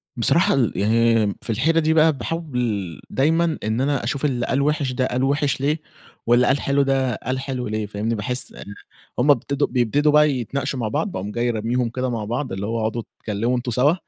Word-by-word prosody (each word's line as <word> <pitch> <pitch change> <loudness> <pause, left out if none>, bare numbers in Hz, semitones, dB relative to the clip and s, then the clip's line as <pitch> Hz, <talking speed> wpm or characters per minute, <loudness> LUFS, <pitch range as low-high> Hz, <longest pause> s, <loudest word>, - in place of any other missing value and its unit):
بصراحة 150 +9 +3
ال 130 -5 +2
يعني 115 +1 +3
في - - -9
الحيرة 155 +9 +2
دي 160 0 +2
بقى 160 0 +5
باحاول 125 - -3
دايمًا 160 +4 +1
إن 110 +3 -1
أنا 140 -1 0
أشوف 135 +4 -2
اللي 125 -4 0
قال 135 - 0
وِحِش 145 -2 0
ده 130 +1 0
قال 125 +1 -1
وِحِش 140 0 0
ليه، 150 +3 0 0.4
واللي 120 +1 +4
قال 140 - +2
حلو 140 +1 +2
ده 135 -3 +1
قال 130 +5 -3
حلو 130 -2 -4
ليه، 110 0 -2
فاهمني؟ 105 +3 -2
باحس 125 +4 -2
إن 100 - -9 0.5
هم 140 +4 +5
ابتدوا 140 +2 +1
بيبتدوا 140 +5 +2
بقى 150 0 +5
يتناقشوا 135 +1 -3
مع 115 - -1
بعض، 190 - -1
باقوم 100 - -5
جاى 120 +2 -1
رميهم 120 +2 -1
كده 130 +2 -2
مع 115 -3 -3
بعض، 120 +5 -3
اللي 95 +1 -3
هو 115 +2 -2
اقعدوا 110 +2 -1 0.2
اتكلِّموا 115 +4 -1
أنتم 120 0 -3
سَوا 130 +7 +3
125 Hz, 205 wpm, -22 LUFS, 115-140 Hz, 0.5 s, بقى